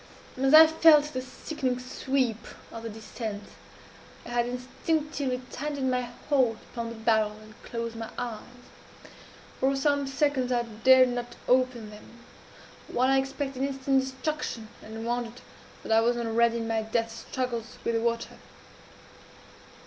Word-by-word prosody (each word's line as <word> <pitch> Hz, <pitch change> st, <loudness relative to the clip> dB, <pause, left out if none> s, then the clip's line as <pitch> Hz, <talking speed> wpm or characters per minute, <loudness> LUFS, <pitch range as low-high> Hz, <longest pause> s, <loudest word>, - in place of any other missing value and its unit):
"As 270 Hz, +1 st, +2 dB
I 315 Hz, +1 st, +11 dB
felt 315 Hz, -2 st, +5 dB
the 255 Hz, -, -2 dB
sickening 255 Hz, 0 st, -3 dB
sweep 250 Hz, -2 st, -1 dB, 0.2 s
of 230 Hz, -, -7 dB
the 230 Hz, -, -5 dB
descent, 215 Hz, -1 st, -6 dB, 0.8 s
I -, -, -8 dB
had 240 Hz, 0 st, +1 dB
instinctively 260 Hz, +1 st, -2 dB
tightened 280 Hz, -2 st, -2 dB
my 250 Hz, -1 st, -1 dB, 0.2 s
hold 255 Hz, -6 st, +3 dB
upon 235 Hz, -1 st, -4 dB
the 230 Hz, -, -7 dB
barrel, 220 Hz, -1 st, +2 dB
and 215 Hz, 0 st, -14 dB
closed 230 Hz, -1 st, -4 dB
my 225 Hz, -1 st, -5 dB
eyes. 235 Hz, -3 st, -4 dB, 1.2 s
For 270 Hz, +1 st, +2 dB
some 285 Hz, 0 st, +1 dB
seconds 270 Hz, -2 st, +1 dB
I 240 Hz, -1 st, +2 dB
dared 255 Hz, +3 st, +5 dB
not 245 Hz, 0 st, -4 dB
open 250 Hz, -4 st, +2 dB
them 235 Hz, +3 st, -14 dB, 0.6 s
while 255 Hz, +2 st, +1 dB
I 270 Hz, 0 st, +5 dB
expected 270 Hz, 0 st, -3 dB
instant 270 Hz, 0 st, +1 dB
destruction, 265 Hz, -3 st, -4 dB
and 225 Hz, +1 st, -7 dB
wondered 240 Hz, 0 st, -3 dB, 0.4 s
that -, -, -5 dB
I 220 Hz, 0 st, +6 dB
was 240 Hz, +1 st, +2 dB
not 235 Hz, -, -2 dB
already 230 Hz, +1 st, +2 dB
in 225 Hz, -1 st, -3 dB
my 225 Hz, -1 st, 0 dB
death 225 Hz, +1 st, -1 dB, 0.2 s
struggles 245 Hz, -2 st, -3 dB
with 235 Hz, -, 0 dB
the 230 Hz, -, +1 dB
water. 230 Hz, 0 st, -2 dB
245 Hz, 150 wpm, -28 LUFS, 230-270 Hz, 1.2 s, I